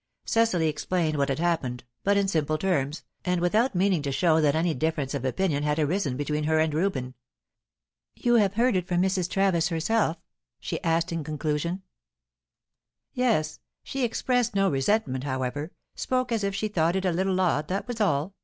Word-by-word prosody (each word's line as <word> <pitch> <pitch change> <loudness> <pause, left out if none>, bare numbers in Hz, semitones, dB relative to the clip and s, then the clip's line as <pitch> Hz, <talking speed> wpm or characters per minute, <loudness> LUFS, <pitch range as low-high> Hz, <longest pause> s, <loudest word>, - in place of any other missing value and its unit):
Cecily 225 -8 +2
explained 155 0 -1
what 140 0 +1
had 135 - 0
happened, 155 -8 -1 0.2
but 200 0 +3
in 200 -1 +2
simple 155 -4 0
terms, 155 -4 -1 0.2
and 180 -1 0
without 215 +7 +2
meaning 185 -2 +2
to 140 -1 -2
show 160 +2 +3
that 145 -1 +3
any 165 +1 +1
difference 150 -1 -1
of 140 -3 -3
opinion 145 +2 0
had 150 0 0
arisen 155 -3 0
between 150 +1 -1
her 160 +1 +2
and 155 -1 +2
Reuben. 150 -7 -1 1.0
"You 240 -1 +2
have 200 -3 +2
heard 240 0 +3
of - - +4
it 180 - -8
from 175 -1 +1
Mrs. 185 -2 0
Travis 190 -4 +2
herself?" 170 +1 0 0.4
she - - -4
asked, 165 -1 +1
in 165 -2 -2
conclusion. 155 +4 -2 1.3
"Yes. 210 -12 0 0.2
She 270 -1 -3
expressed 245 0 0
no 195 -1 +3
resentment, 135 - 0
however; 135 +3 -3 0.2
spoke 255 -1 -1
as 225 -3 0
if 200 0 -1
she 215 +2 -1
thought 170 -4 +1
it 190 0 -1
a 185 - +2
little 185 +2 0
odd, 155 -5 +1
that 195 +5 -3
was 240 -2 -4
all. 180 -2 +1
170 Hz, 180 wpm, -26 LUFS, 150-195 Hz, 1.3 s, of